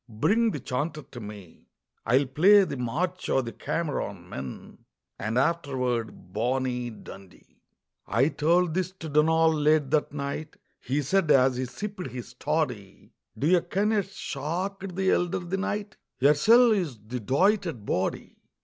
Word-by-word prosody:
bring 215 - +2
the 150 - -4
chanter 145 +4 -3
to 120 - -8
me, 105 -5 -11 0.4
I'll 130 +5 +4
play 185 +10 +6
the 180 - -3
'March 170 +9 -2
o' 135 - +3
the 115 -2 -6
Cameron 105 - -3
Men,' 65 -6 -8 0.4
And 110 +3 -2
afterward 130 - -1
'Bonnie 125 +2 -1
Dundee.'" 100 -4 -14 0.5
I 130 +7 +2
told 170 +2 +2
this 185 0 -1
to 165 -4 -8
Donald 160 +2 +3
late 150 -2 +2
that 155 -1 +1
night; 145 +2 -5 0.2
He 140 +4 -1
said, 190 +3 +1
as 130 -2 +5
he 130 - -1
sipped 200 +6 -6
his 125 -1 -8
toddy, - - -3 0.3
"Do 140 - -2
ye 175 +2 +4
ken 205 +5 0
ye 215 -2 +3
shocked 185 +2 -5
the 190 0 +2
elder 175 -1 +1
the 175 +1 -3
night? 205 +1 -3 0.2
Yersel' 215 - +6
is 165 - -2
the 110 +4 -6
doited 165 - +1
body. 95 -1 -2
150 Hz, 150 wpm, -27 LUFS, 125-180 Hz, 0.5 s, play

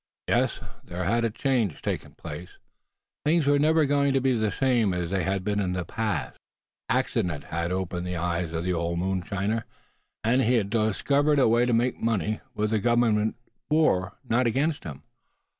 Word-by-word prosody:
Yes, - - +1 0.2
there 90 +1 -5
had 115 +6 +1
a - - +1
change 115 - 0
taken - - -3
place; 85 +5 -8 0.7
things 160 0 +2
were 145 0 +4
never 155 +1 +4
going 140 0 +2
to 135 - +3
be 130 0 +2
the 110 -2 +1
same 115 -4 +1
as 90 -1 -3
they 95 -1 +1
had 95 +1 -1
been 105 +1 0
in 95 -2 0
the 90 -1 -2
past. 110 +3 -3 0.5
Accident 80 -5 0
had 85 +1 -3
opened 90 -1 -2
the 90 -1 -3
eyes 85 0 -1
of 80 0 -3
the 90 0 0
old 85 0 -1
mountaineer, 95 +4 -1 0.6
and 120 +4 +3
he 125 0 +3
had 100 -4 0
discovered 140 +7 +2
a 135 - +5
way 120 +2 +3
to 120 - +1
make 120 +2 +1
money, 110 -1 0 0.2
with 105 0 0
the 110 - +2
Government 110 -1 +2 0.3
for, 150 - +2
not 120 +2 +2
against 145 +6 0
him. 75 -5 -8
110 Hz, 180 wpm, -26 LUFS, 90-125 Hz, 0.7 s, a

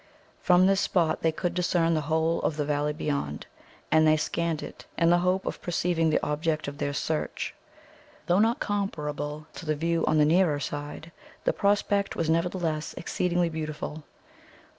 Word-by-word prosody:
From 180 0 +5
this 195 +1 +3
spot 165 -4 +1
they 160 - +2
could 175 +2 -2
discern 175 -2 +2
the 155 - +1
whole 160 +2 +1
of 155 - -1
the 150 - 0
valley 145 0 0
beyond, 140 - -3 0.5
and 155 0 +5
they 155 0 +5
scanned 165 0 -1
it - - -10
in 170 0 +4
the 175 - +5
hope 185 +2 +1
of - - -4
perceiving 170 -2 +1
the 155 - +1
object 155 +1 -1
of 140 0 -6
their 145 - -1
search. 155 +2 -2 0.7
Though 175 +2 +3
not 230 +6 +3
comparable 150 -7 -3
to - - -9
the 155 -1 0
view 165 +2 0
on 155 - +3
the 150 - +5
nearer 160 -2 +3
side, 145 +3 -6 0.3
the - - +2
prospect 200 0 +1
was 160 -1 0
nevertheless 165 -2 -1
exceedingly 175 0 0
beautiful. 155 -1 -5
160 Hz, 170 wpm, -27 LUFS, 150-175 Hz, 0.7 s, From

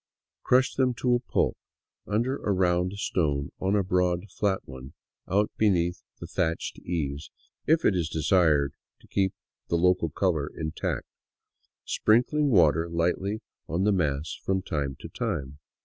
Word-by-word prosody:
Crush 130 +2 +3
them 130 -2 +1
to 125 +1 +1
a 120 - +3
pulp 120 - 0 0.3
— - - -47
under 120 +6 0
a 105 - -2
round 90 -1 +2
stone 75 -8 -1
on 95 +2 +1
a 100 - +2
broad 90 +1 0
flat 100 -2 0
one 65 0 -10 0.3
out 105 +3 +1
beneath 90 -5 +2 0.2
the - - -6
thatched 85 -1 -2
eaves, 75 -4 -3 0.4
if 160 +1 +3
it 100 - +4
is 85 -3 0
desired 80 -3 +3 0.3
to - - -20
keep 95 0 0 0.3
the 85 - +1
local 90 -1 +3
color 80 -3 0
intact 80 0 -3 0.5
— - - -56 0.3
sprinkling 135 +7 +2
water 85 - +4
lightly 90 +5 -1 0.3
on 85 +5 -1
the 105 - +4
mass 75 -4 0
from 95 -1 0
time 70 -6 -2
to - - -7
time. 70 +2 -4
90 Hz, 155 wpm, -27 LUFS, 80-100 Hz, 0.5 s, it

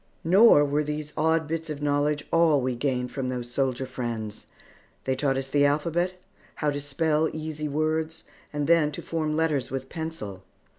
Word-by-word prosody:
Nor 180 -3 +7
were 145 +1 +1
these 150 0 -4
odd 160 +1 +2
bits 165 +1 -3
of 150 -2 -4
knowledge 145 0 +1
all 165 -3 +4
we 130 -1 -1
gained 125 -1 -1
from 135 -2 -3
those 120 -1 -4
soldier 130 0 0
friends. 115 -4 -5 0.6
They 130 - 0
taught 135 0 +1
us 135 0 -2
the 145 +1 +2
alphabet, 165 +5 +1 0.4
how 150 -1 0
to 145 - -3
spell 150 +2 +1
easy 155 -1 -4
words, 155 +2 -1 0.3
and 145 -1 -1
then 160 -1 +4
to - - -6
form 155 -2 -1
letters 155 -5 +1
with 135 0 -4
pencil. 160 - -5
150 Hz, 170 wpm, -26 LUFS, 135-160 Hz, 0.6 s, Nor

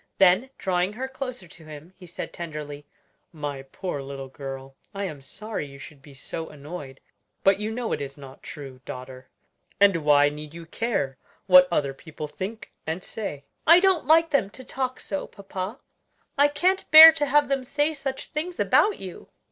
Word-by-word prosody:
Then 195 +7 +4
drawing 185 +1 0
her 255 +4 -4
closer 255 -7 -7
to 165 - -13
him, 155 +3 -11
he 180 - -14
said 175 - -7
tenderly, 150 -3 -7 0.4
"My 145 -4 -5
poor 145 +3 -5
little 135 -1 -7
girl, 135 0 -8 0.2
I 200 - -3
am 155 -7 -5
sorry 210 +2 -5
you 140 0 -12
should 140 +1 -12
be 140 0 -15
so 160 +4 -6
annoyed; 145 -2 -9 0.4
but 195 0 +4
you 210 +1 -2
know 230 +1 -3
it - - -1
is 140 0 -6
not 135 -2 -12
true, 135 -4 -9
daughter, 130 0 -9 0.5
and 200 -3 +5
why 145 -2 +4
need 150 +1 -9
you 170 -1 -9
care 165 - -2 0.3
what 180 -1 +8
other 140 -5 0
people 155 +2 -8
think 195 +8 -7 0.2
and 165 +4 -3
say?" 150 -11 -6 0.2
"I 335 +2 +9
don't 375 -7 +2
like 325 +1 +5
them 255 -9 +2
to 260 +5 -12
talk 255 0 -3
so, 195 - -4
papa! 195 +2 -6 0.6
I 285 0 +5
can't 355 +7 0
bear 320 +1 +12
to 295 -2 -1
have 290 +1 +4
them 270 -1 -1
say 290 +4 0
such 270 -2 -5
things 345 +4 -4
about 425 - +3
you!" 185 -2 -9
180 Hz, 180 wpm, -25 LUFS, -, 0.6 s, bear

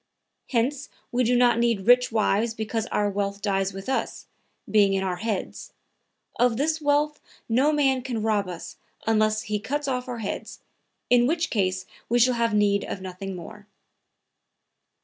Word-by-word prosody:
Hence 260 +3 0 0.2
we 250 +1 +1
do 245 +1 +2
not 240 -1 +4
need 235 -4 +2
rich 250 +1 +5
wives 220 +1 +1
because 220 +1 -3
our 205 - 0
wealth 200 0 -2
dies 195 -2 0
with 195 0 -9
us, 265 - -2 0.4
being 205 -2 +4
in 195 0 0
our 185 -2 -2
heads. 215 -1 -4 0.7
Of 245 -2 +3
this 310 +3 0
wealth 295 +1 +1 0.3
no 260 +6 +3
man 270 -3 +2
can 240 -4 -3
rob 210 -3 +1
us 175 -2 -8 0.3
unless 215 0 +2
he 210 0 -2
cuts 290 +6 -3
off 250 -1 -2
our 245 -1 -4
heads, 215 -3 -5 0.5
in 245 0 +5
which 320 +2 0
case 185 -3 0 0.2
we 240 - +3
should 250 +1 +4
have 235 -1 +1
need 200 -1 +3
of - - -5
nothing 190 +1 -6
more." 205 +4 -10
225 Hz, 165 wpm, -25 LUFS, 200-250 Hz, 0.7 s, rich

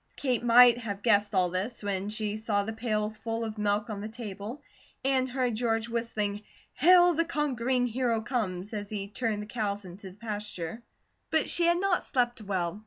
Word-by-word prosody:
Kate 250 -4 -1
might 240 0 +7
have 205 -4 -5
guessed 205 -2 +3
all 180 -1 +3
this 200 +6 -3
when 200 0 -2
she 215 -1 -2
saw 215 -2 0
the 220 +2 -4
pails 215 -2 -2
full 230 0 -3
of 215 -1 -6
milk 210 +2 +1
on 210 -3 -5
the 215 - -5
table, 220 +3 -7 0.4
and 260 -1 +2
heard 250 -2 0
George 225 0 0
whistling 215 -3 -2 0.3
"Hail 355 +4 +6
the 330 +1 +2
Conquering 260 -6 0
Hero 240 -1 0
Comes," 215 -4 -3
as 205 -1 -4
he 200 -2 -4
turned 210 0 -2
the - - -8
cows 205 -2 -3
into 190 +2 -9
the 185 - -16
pasture; 210 -3 -5 0.5
but 315 -1 +2
she 340 -1 +2
had 345 0 +3
not 385 -2 +2
slept 240 -4 0
well. 185 -2 -2
220 Hz, 185 wpm, -29 LUFS, 205-245 Hz, 0.5 s, might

